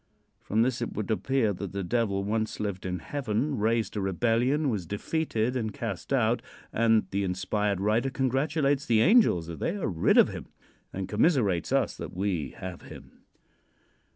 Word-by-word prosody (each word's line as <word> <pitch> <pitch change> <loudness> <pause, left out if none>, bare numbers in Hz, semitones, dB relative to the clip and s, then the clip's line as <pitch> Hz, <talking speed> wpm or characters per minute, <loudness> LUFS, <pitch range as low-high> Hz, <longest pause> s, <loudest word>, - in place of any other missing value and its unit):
From 110 +2 +1
this 125 0 -1
it 120 - -3
would 110 +1 -3
appear 115 -1 +1
that 95 0 -6
the 100 0 -2
Devil 100 -1 0
once 110 +2 -2
lived 100 -3 -3
in 90 0 -2
heaven, 130 - -2
raised 110 -1 0
a 105 - -1
rebellion, 120 - +1
was 105 -9 -2
defeated 120 - -1
and 110 -4 -1
cast 110 -3 -5
out, 120 -3 +2 0.3
and 115 -1 +3
the 100 +1 0
inspired 100 +2 -1
writer 110 +6 +1
congratulates 140 +2 0
the 110 -2 +4
angels 195 - +5
that 85 -1 -7
they 170 - -1
are 195 - -2
rid 85 -4 +2
of - - +7
him - - -7 0.4
and 95 -1 -4
commiserates 105 - +2
us - - +1
that - - -7
we 90 -7 -1
have 90 -2 -7
him. - - -13
110 Hz, 170 wpm, -28 LUFS, 100-130 Hz, 0.4 s, of